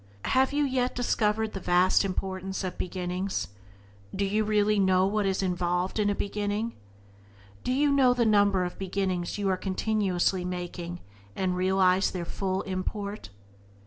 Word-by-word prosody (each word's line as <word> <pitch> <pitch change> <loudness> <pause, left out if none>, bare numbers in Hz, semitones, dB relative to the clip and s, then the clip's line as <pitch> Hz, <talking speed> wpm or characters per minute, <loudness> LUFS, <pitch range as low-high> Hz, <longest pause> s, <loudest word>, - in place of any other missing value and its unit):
Have 265 +1 +3
you 290 +1 +1
yet 255 -2 0
discovered 220 -2 0
the 195 - -4
vast 180 +2 +3
importance 190 0 -3
of 185 -1 -3
beginnings? 185 +1 -3 0.7
Do 200 +1 0
you 210 +2 +1
really 210 0 +2
know 190 -1 +4
what 205 0 0
is 195 0 0
involved 180 +1 -1
in 205 -1 +2
a 205 - 0
beginning? 205 +3 -2 0.9
Do - - -1
you 285 +3 +3
know 270 -3 +5
the 240 -1 +2
number 205 -3 +4
of 180 - -5
beginnings 190 -2 -2
you 205 -1 -1
are 185 - +1
continuously 190 -2 0
making, 175 -1 -5 0.3
and 185 -1 0
realize 185 +1 +3
their 175 -2 -4
full 190 +1 -2
import? 200 - -4
195 Hz, 150 wpm, -28 LUFS, 185-210 Hz, 0.9 s, know